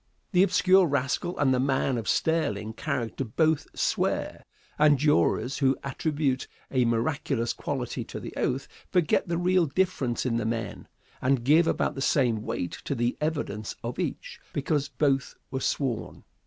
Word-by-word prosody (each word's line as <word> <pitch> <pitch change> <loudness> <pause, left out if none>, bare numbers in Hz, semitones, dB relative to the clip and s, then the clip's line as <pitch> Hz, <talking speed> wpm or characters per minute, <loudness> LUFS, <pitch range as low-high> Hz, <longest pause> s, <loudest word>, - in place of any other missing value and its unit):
The 180 -2 +4
obscure 190 -1 +5
rascal 140 +5 -1
and 135 -3 +3
the 125 - +2
man 135 0 +1
of 115 -3 -3
sterling 155 -9 0
character 130 -2 -3
both 155 +6 +1
"swear," - - -1 0.4
and 150 -1 +6
jurors 140 -2 +2
who 135 -2 +3
attribute 140 -1 -1 0.2
a 130 -2 +3
miraculous 120 0 0
quality - - -3
to - - -7
the - - -8
oath, 135 +2 -1 0.2
forget 180 -3 +2
the 170 -1 -1
real 180 -1 +3
difference 140 -7 0
in 115 -2 +1
the 115 - -1
men, 115 -1 -3 0.3
and 130 -2 +2
give 155 +6 +5
about - - +1
the 135 - -6
same 120 -6 +2
weight 90 -5 -3
to 140 - -1
the 120 0 0
evidence 145 -9 -2
of - - -4
each, - - -4
because 145 0 0
both 135 -4 0 0.2
were 130 - -2
"sworn." 130 -5 -2
135 Hz, 155 wpm, -27 LUFS, 120-155 Hz, 0.4 s, and